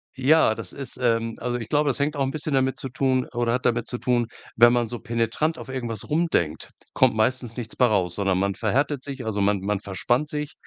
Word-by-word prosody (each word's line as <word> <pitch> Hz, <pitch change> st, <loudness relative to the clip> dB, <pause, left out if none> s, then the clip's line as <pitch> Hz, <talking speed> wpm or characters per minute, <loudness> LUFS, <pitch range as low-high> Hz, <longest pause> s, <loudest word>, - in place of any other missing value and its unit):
Ja, 135 Hz, -2 st, +4 dB
das 110 Hz, -5 st, -4 dB
ist 135 Hz, -2 st, -4 dB
ähm, 115 Hz, -2 st, +1 dB
also 120 Hz, 0 st, -2 dB
ich 115 Hz, -3 st, -7 dB
glaube, 145 Hz, -1 st, +2 dB
das 130 Hz, -, 0 dB
hängt 145 Hz, +1 st, 0 dB
auch 140 Hz, -, -2 dB
'n 130 Hz, -, 0 dB
bisschen 150 Hz, 0 st, -2 dB
damit 130 Hz, 0 st, +1 dB
zu 135 Hz, -, -5 dB
tun 130 Hz, 0 st, 0 dB
oder 120 Hz, -1 st, 0 dB
hat 125 Hz, -, -2 dB
damit 120 Hz, -1 st, +1 dB
zu 125 Hz, -, -3 dB
tun, 120 Hz, -2 st, 0 dB, 0.3 s
wenn 120 Hz, +1 st, +7 dB
man 120 Hz, -2 st, +1 dB
so 120 Hz, 0 st, -6 dB
penetrant 115 Hz, +8 st, -1 dB
auf -, -, -9 dB
irgendwas 120 Hz, -5 st, -4 dB
rum 165 Hz, +3 st, +1 dB
denkt, 80 Hz, -2 st, 0 dB, 0.2 s
kommt 130 Hz, -4 st, +3 dB
meistens 120 Hz, +1 st, 0 dB
nichts 115 Hz, -3 st, -5 dB
bei 125 Hz, -, +4 dB
raus, 90 Hz, -5 st, 0 dB
sondern 95 Hz, -1 st, 0 dB
man 100 Hz, +1 st, 0 dB
verhärtet 135 Hz, +6 st, 0 dB
sich, 135 Hz, -3 st, -6 dB
also 105 Hz, -2 st, -1 dB
man 100 Hz, -1 st, +2 dB
man 105 Hz, 0 st, -1 dB
verspannt 120 Hz, +9 st, -1 dB
sich 150 Hz, 0 st, -2 dB
120 Hz, 235 wpm, -24 LUFS, 110-135 Hz, 0.3 s, wenn